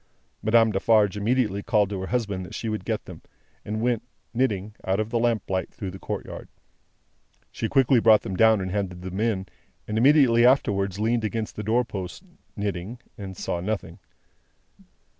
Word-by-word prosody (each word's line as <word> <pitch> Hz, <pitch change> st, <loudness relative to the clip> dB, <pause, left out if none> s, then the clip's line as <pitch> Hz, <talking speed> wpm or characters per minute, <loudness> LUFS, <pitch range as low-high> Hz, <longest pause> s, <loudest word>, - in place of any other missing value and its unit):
Madame 115 Hz, 0 st, +4 dB
Defarge 105 Hz, 0 st, +3 dB
immediately 105 Hz, -1 st, 0 dB
called 105 Hz, -2 st, +2 dB
to 95 Hz, -2 st, -3 dB
her 95 Hz, -, -4 dB
husband 105 Hz, -6 st, -2 dB
that 90 Hz, -, -9 dB
she 115 Hz, -, -3 dB
would 110 Hz, 0 st, -4 dB
get -, -, -2 dB
them, -, -, -10 dB, 0.4 s
and 110 Hz, +1 st, -3 dB
went, 120 Hz, -1 st, +1 dB, 0.3 s
knitting, 110 Hz, -5 st, 0 dB
out 95 Hz, +2 st, 0 dB
of 110 Hz, +1 st, -2 dB
the 120 Hz, -, +1 dB
lamplight, 110 Hz, -5 st, 0 dB
through 100 Hz, -5 st, -6 dB
the 95 Hz, -, -10 dB
courtyard. -, -, -6 dB, 1.0 s
She 110 Hz, -, -3 dB
quickly 135 Hz, -2 st, +4 dB
brought 110 Hz, -1 st, +6 dB
them 95 Hz, -, -4 dB
down 110 Hz, 0 st, +5 dB
and 95 Hz, -1 st, -3 dB
handed 90 Hz, -3 st, -3 dB
them 95 Hz, +1 st, -5 dB
in; 105 Hz, -4 st, 0 dB, 0.4 s
and 110 Hz, +1 st, -1 dB
immediately 130 Hz, -3 st, +5 dB
afterwards 100 Hz, -7 st, +2 dB
leaned 115 Hz, +1 st, +1 dB
against 110 Hz, 0 st, -3 dB
the -, -, -4 dB
door 115 Hz, +4 st, +1 dB
post, 95 Hz, -, -6 dB, 0.3 s
knitting, 100 Hz, +2 st, -3 dB, 0.2 s
and 95 Hz, -4 st, -8 dB
saw 85 Hz, -, -2 dB
nothing. 95 Hz, -2 st, -4 dB
105 Hz, 170 wpm, -25 LUFS, 95-115 Hz, 1.0 s, brought